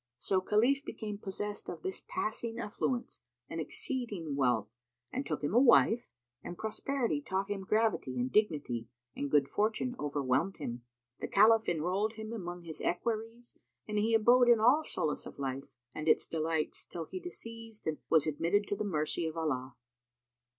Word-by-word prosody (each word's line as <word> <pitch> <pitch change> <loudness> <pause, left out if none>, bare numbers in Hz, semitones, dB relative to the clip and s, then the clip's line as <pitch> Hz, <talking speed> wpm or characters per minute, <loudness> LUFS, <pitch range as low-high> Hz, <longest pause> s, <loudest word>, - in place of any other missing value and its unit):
So 185 +8 +1
Khalif 240 +9 +3
became 210 -6 -5
possessed 205 +1 -4
of 170 -3 -7
this 190 - -3
passing 225 +1 -2
affluence 240 +2 -2 0.3
and 165 - -4
exceeding 200 - -3
wealth 125 -6 +1 0.4
and 265 - -2
took - - -3
him 145 - 0
a 240 - +7
wife, 240 -2 +5 0.3
and 175 - -6
prosperity 220 - -1
taught 190 +6 -2
him 195 -1 -2
gravity 215 - +1
and 125 +1 -1
dignity, 145 - +1 0.3
and 140 - -2
good 145 -2 +4
fortune 220 - 0
overwhelmed 145 +5 0
him. 120 +1 -5 0.4
The - - -3
Caliph 220 +2 +5
enrolled 180 +6 0
him 220 0 -6
among 175 -5 -5
his 160 -2 -6
equerries 225 +5 -2 0.3
and 210 0 0
he 225 +2 +3
abode 240 +3 +6
in 235 -2 +7
all 255 +8 +5
solace 150 - -2
of - - -11
life 135 -1 -4 0.2
and 155 0 -5
its - - +4
delights 160 -1 -1
till 165 -2 -6
he 370 - -6
deceased 230 -11 -9
and 155 -1 -1
was 160 -3 +5
admitted 170 +7 +1
to 205 - +1
the 200 - -2
mercy 165 -3 -1
of 160 +1 -5
Allah. 130 -5 -2
200 Hz, 165 wpm, -32 LUFS, 155-225 Hz, 0.4 s, a